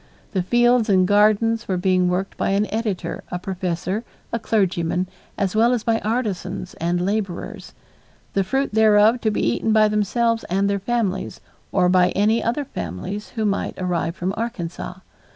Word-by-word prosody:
The 190 - 0
fields 240 +3 +3
and 185 -2 +4
gardens 215 +3 +3
were 185 - 0
being 180 0 +2
worked 185 +2 -2
by - - -1
an 210 - +2
editor, 215 -4 -2
a 180 - -3
professor, 185 +2 -3 0.3
a 230 - 0
clergyman, 185 -5 0 0.3
as 200 -1 -1
well 230 +3 +4
as 235 -3 -1
by 230 -1 +1
artisans 215 -5 -3
and 175 +1 0
laborers, 200 -1 -3 0.6
the 195 - +2
fruit 270 +6 -1
thereof 220 +2 +5
to 220 - +2
be 210 - 0
eaten 225 - +1
by 215 -1 +5
themselves 225 +2 +1
and 195 +3 +1
their 200 0 0
families 200 -3 -2 0.3
or 180 - +3
by 180 0 +4
any 220 +3 +2
other 245 +5 -1
families 185 - -5
who 220 -2 0
might 200 -1 -1
arrive 175 -2 -1
from 185 +2 -2
Arkansas. 185 -5 -5
205 Hz, 165 wpm, -22 LUFS, 185-225 Hz, 0.6 s, thereof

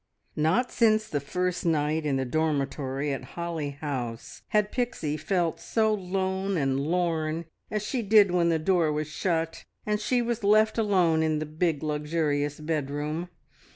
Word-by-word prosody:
Not 165 +12 +2
since 215 -2 +3
the 145 - -1
first 180 +5 -2
night 155 -1 +1
in 140 - +1
the 135 0 0
dormitory 140 -1 -1
at 135 - -5
Holly 170 -4 -2
House 125 -6 -4
had 210 -1 +1
Pixie 240 - -1
felt 175 0 -1
so 220 -1 +1
lone 190 0 -1
and 135 -3 +1
lorn 165 0 0 0.2
as 210 -1 -2
she 245 +3 -1
did 205 -2 +5
when 175 -1 +3
the 165 - +3
door 165 -1 +2
was 150 +1 -1
shut, 165 0 -2 0.2
and 210 0 0
she 250 +3 +1
was 235 -1 -2
left 215 +2 +4
alone 180 -7 +3
in 155 -1 +1
the 155 - -2
big, 155 0 -1
luxurious 150 -1 -1
bedroom. 150 +2 -2
165 Hz, 155 wpm, -27 LUFS, 150-195 Hz, 0.2 s, did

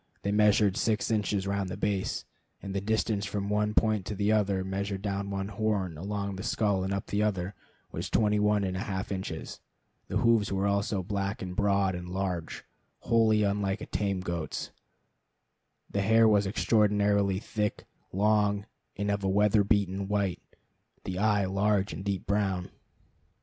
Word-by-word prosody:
They 100 - 0
measured 105 -1 +4
six 110 -2 0
inches 105 -2 0
round 100 -1 -1
the - - -5
base, 100 -2 -1 0.3
and 100 -1 -6
the 100 - -1
distance 110 0 0
from 100 0 -3
one 105 0 0
point 110 -3 +3
to 105 - -3
the 100 +2 +1
other, 100 -3 +2
measured 95 +1 -3
down 100 -1 -2
one 100 0 -3
horn, 105 -5 -1
along 100 +3 -4
the - - -5
skull, 100 -3 0
and 95 - -2
up 100 0 -2
the 100 - -1
other, 100 -3 -1 0.4
was - - -4
twenty 105 -1 +2
one 105 0 +2
and 95 -1 -2
a - - -2
half 95 0 -3
inches. 95 -4 -5 0.5
The - - -1
hoofs 115 -4 +3
were 95 0 0
also 100 -1 0
black 100 +1 -3
and 90 -1 -5
broad 100 -1 +2
and 90 0 -6
large, 90 -3 -3 0.4
wholly 110 -2 +3
unlike 100 0 0
a - - -6
tame 100 -3 -1
goat's. 85 -3 -4 1.2
The 100 - -1
hair 110 +3 +5
was 105 -2 +4
extraordinarily 105 -2 +2
thick, 105 0 -3 0.3
long, 105 0 +2 0.3
and 100 0 -1
of 100 0 -2
a 95 - +1
weather 105 +1 +4
beaten 100 -1 +1
white; 100 -3 0 0.6
the 95 0 -4
eye 105 -1 +3
large 100 +1 +1
and 95 - -6
deep 100 -2 -2
brown. 95 -3 0
100 Hz, 170 wpm, -29 LUFS, 95-105 Hz, 1.2 s, hair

